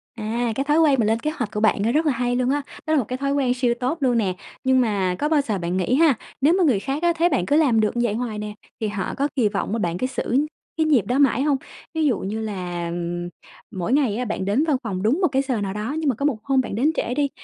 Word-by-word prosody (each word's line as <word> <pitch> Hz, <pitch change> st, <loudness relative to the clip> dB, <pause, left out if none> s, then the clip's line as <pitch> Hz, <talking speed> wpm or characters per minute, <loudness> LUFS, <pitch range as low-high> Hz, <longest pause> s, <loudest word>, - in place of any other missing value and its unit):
À, 230 Hz, +1 st, -2 dB
cái 270 Hz, -, 0 dB
thói 295 Hz, +3 st, +2 dB
quen 290 Hz, -5 st, +4 dB
mà 225 Hz, -, +3 dB
lên 225 Hz, +2 st, +1 dB
kế 305 Hz, +5 st, -2 dB
hoạch 245 Hz, -9 st, -4 dB
của 210 Hz, -, -3 dB
bạn 215 Hz, -2 st, +2 dB
á, 225 Hz, -, +2 dB
rất 310 Hz, +5 st, +2 dB
là 300 Hz, -, +3 dB
hay 245 Hz, -1 st, -1 dB
luôn 250 Hz, 0 st, +1 dB
á. 290 Hz, +2 st, +1 dB, 0.3 s
Đó 310 Hz, -, +2 dB
là 310 Hz, -, +4 dB
một 250 Hz, -, -1 dB
cái 255 Hz, -, -3 dB
thói 275 Hz, +1 st, -1 dB
quen 265 Hz, -3 st, +2 dB
siêu 250 Hz, -1 st, +1 dB
tốt 260 Hz, +6 st, -1 dB
luôn 250 Hz, -3 st, +2 dB
nè. 195 Hz, -5 st, 0 dB, 0.3 s
Nhưng 260 Hz, -1 st, +4 dB
mà 195 Hz, -6 st, 0 dB
có 295 Hz, -, 0 dB
bao 310 Hz, -2 st, +3 dB
giờ 220 Hz, -7 st, -2 dB
bạn 175 Hz, 0 st, -2 dB
nghĩ 190 Hz, +7 st, +1 dB
ha, 315 Hz, 0 st, +5 dB, 0.3 s
nếu 295 Hz, +5 st, +5 dB
mà 375 Hz, -, +3 dB
người 260 Hz, -, +3 dB
khác 275 Hz, -, -3 dB
á, 345 Hz, 0 st, +4 dB
thấy 340 Hz, +2 st, +3 dB
bạn 180 Hz, -, 0 dB
cứ 285 Hz, -, +2 dB
làm 280 Hz, -8 st, +4 dB
được 215 Hz, +2 st, 0 dB
như 240 Hz, -, +2 dB
vậy 205 Hz, -, -1 dB
hoài 225 Hz, -1 st, -3 dB
nè, 210 Hz, 0 st, -5 dB, 0.3 s
thì 220 Hz, -, 0 dB
họ 205 Hz, -3 st, -3 dB
có 280 Hz, +1 st, +1 dB
kỳ 245 Hz, -6 st, +3 dB
vọng 200 Hz, -1 st, -3 dB
mà 230 Hz, -, 0 dB
bạn 175 Hz, -3 st, -1 dB
cứ 255 Hz, -, -1 dB
giữ 265 Hz, +2 st, 0 dB, 0.3 s
cái 320 Hz, -, +2 dB
nhịp 285 Hz, -9 st, +3 dB
đó 250 Hz, +3 st, 0 dB
mãi 270 Hz, -2 st, +3 dB
hông? 290 Hz, -2 st, +2 dB, 0.4 s
Ví 320 Hz, -1 st, +1 dB
dụ 255 Hz, -8 st, +2 dB
như 205 Hz, +3 st, -3 dB
là, 180 Hz, -5 st, -4 dB, 0.8 s
mỗi 190 Hz, +3 st, -2 dB
ngày 270 Hz, -7 st, +2 dB
á, 250 Hz, -, -2 dB
bạn 205 Hz, -3 st, -3 dB
đến 210 Hz, +9 st, +2 dB
văn 295 Hz, -4 st, +2 dB
phòng 195 Hz, -5 st, -3 dB
đúng 260 Hz, -, +2 dB
một 365 Hz, -, +4 dB
cái 270 Hz, -1 st, +1 dB
giờ 260 Hz, -6 st, -2 dB
nào 195 Hz, -1 st, -2 dB
đó, 215 Hz, +8 st, -3 dB
nhưng 310 Hz, -3 st, +1 dB
mà 255 Hz, -, +1 dB
có 280 Hz, -, -2 dB
một 285 Hz, -6 st, +1 dB
hôm 270 Hz, -1 st, +2 dB
bạn 245 Hz, -, -5 dB
đến 275 Hz, +8 st, +2 dB
trễ 245 Hz, -, -1 dB
đi, 285 Hz, +1 st, +1 dB
245 Hz, 305 wpm, -23 LUFS, 210-280 Hz, 0.8 s, ha